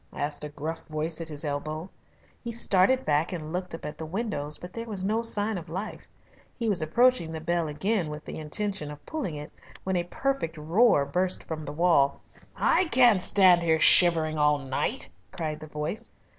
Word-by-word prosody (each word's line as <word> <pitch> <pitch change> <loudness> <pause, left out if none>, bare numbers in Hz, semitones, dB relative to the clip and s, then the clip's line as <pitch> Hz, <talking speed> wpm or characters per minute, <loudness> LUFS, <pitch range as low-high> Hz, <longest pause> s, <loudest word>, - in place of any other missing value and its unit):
asked 145 +1 -3
a 150 - -5
gruff 155 +3 -6
voice 155 +2 -4
at 165 - -5
his 150 0 -4
elbow. 155 +3 -4 0.6
He 235 - -4
started 230 +2 +2
back 150 +2 +1
and 160 -3 -6
looked 180 -1 -4
up - - -10
at 150 - -7
the 160 - -5
windows, 165 -6 -1
but 180 0 -11
there 230 0 -6
was 195 -4 -4
no 220 +3 0
sign 215 -3 -1
of 170 0 -13
life. 190 +6 -6 0.5
He 230 - -3
was 200 -6 +1
approaching 170 +1 +2
the 160 - -5
bell 170 +1 -1
again 185 +3 -1
with 150 0 -8
the - - -7
intention 190 +1 -3
of 150 0 -11
pulling 275 - -4
it, 150 +2 -8 0.3
when 190 0 -2
a 175 - +1
perfect 270 -6 -3
roar 165 +1 +3
burst 180 +6 -1
from 155 -1 -6
the 145 - -6
wall. 150 -3 +2 0.4
"I 375 - +2
can't 245 - +4
stand 185 -2 +5 0.2
shivering 160 -3 +8
here - - 0
all 150 0 +3
night," 140 - -2 0.2
cried 155 -5 -5
the 155 - -10
voice. 155 +10 -5
170 Hz, 195 wpm, -26 LUFS, 150-205 Hz, 0.6 s, shivering